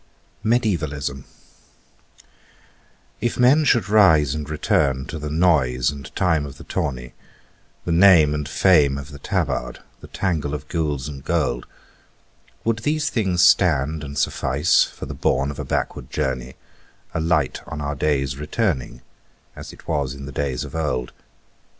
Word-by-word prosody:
"MEDIÆVALISM" 80 - -1 2.0
If 120 +1 -1
men 130 +5 +5
should 115 -8 +3
rise 80 -10 +5
and 75 -1 -5
return 70 -3 +1
to 80 - -6
the 75 0 -5
noise 75 -6 +2
and 70 -3 -10
time 80 -5 +2
of 70 - -11
the - - -11
tourney, 65 -4 -4 0.7
The 85 - -1
name 85 -4 +6
and 75 -1 -3
fame 75 -6 +4
of 70 0 -8
the 70 - -10
tabard, - - -2 0.2
the - - -12
tangle 80 -6 -2
of 75 - -8
gules 75 -5 -2
and 70 -3 -8
gold, - - -1 1.0
Would 115 -1 0
these 150 +4 -1
things 95 -6 +1
stand 80 -4 +3
and 70 0 -7
suffice 70 +5 +2
for - - -9
the - - -6
bourne 70 +2 0
of 70 - -9
a - - -4
backward - - -3
journey, 65 -1 -3 0.6
A - - -1
light 80 -4 0
on 75 - -6
our 75 0 -2
days 70 -2 -1
returning, 75 - -2 0.5
as - - -9
it - - -16
was 70 -5 -1
in 70 0 -9
the 70 - -7
days 70 -2 -2
of - - -9
old? 65 -6 -2
75 Hz, 150 wpm, -22 LUFS, 70-90 Hz, 2.0 s, name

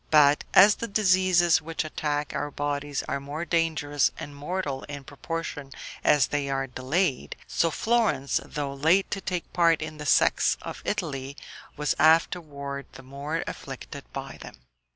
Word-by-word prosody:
But, 150 -1 +5
as 200 +3 +9
the 230 - -4
diseases 185 -5 +3
which 165 +1 -3
attack 150 -1 -2
our 145 - -2
bodies 145 0 -3
are 140 - -1
more 145 +4 -5
dangerous 155 -4 +1
and 145 - -8
mortal 145 -2 -3
in 145 -1 -7
proportion 145 0 -6 0.3
as 145 -4 +5
they 145 -1 -1
are 135 0 0
delayed, 130 - -1
so 165 - +1
Florence, 200 - +1
though 145 -2 -4
late 160 +8 +2
to 195 - -2
take 180 -2 -4
part 165 -2 +4
in 155 0 -6
the 150 - -5
sects - - +4
of - - -7
Italy, 140 -8 -3 0.4
was 150 0 +1
afterward 145 -3 +1
the 135 - -11
more 140 +4 -4
afflicted - - -8
by - - -6
them. - - -10
150 Hz, 150 wpm, -26 LUFS, 140-170 Hz, 0.4 s, as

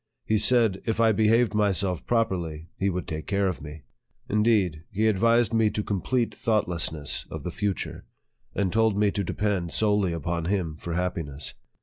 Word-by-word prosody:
He 110 -1 +2
said, 110 -3 +3
if.. 110 -1 -2
I 115 -1 +5
behaved 110 +2 +3
myself 100 -3 +1
properly, 85 -9 -1
he 100 - 0
would 90 -2 -3
take 80 -1 -5
care 100 0 +1
of 90 - -3
me. 75 0 -9 0.4
Indeed, 105 -7 +2
he 105 +3 0
advised 115 +2 +3
me 115 -1 +3
to 105 0 -3
com 100 -3 -2
plete 125 +2 0
thoughtlessness 85 -9 -1
of 80 -3 -7
the 90 - -4
future, 100 +1 -3 0.5
and 95 -3 0
taught 110 -2 +3
me 105 0 +2
to 100 - -2
depend 95 -3 -1
solely 105 -4 +2
upon 85 +1 -2
him 90 -4 -1
for 85 +2 -6
happiness. 85 -6 -3
100 Hz, 170 wpm, -26 LUFS, 85-110 Hz, 0.5 s, I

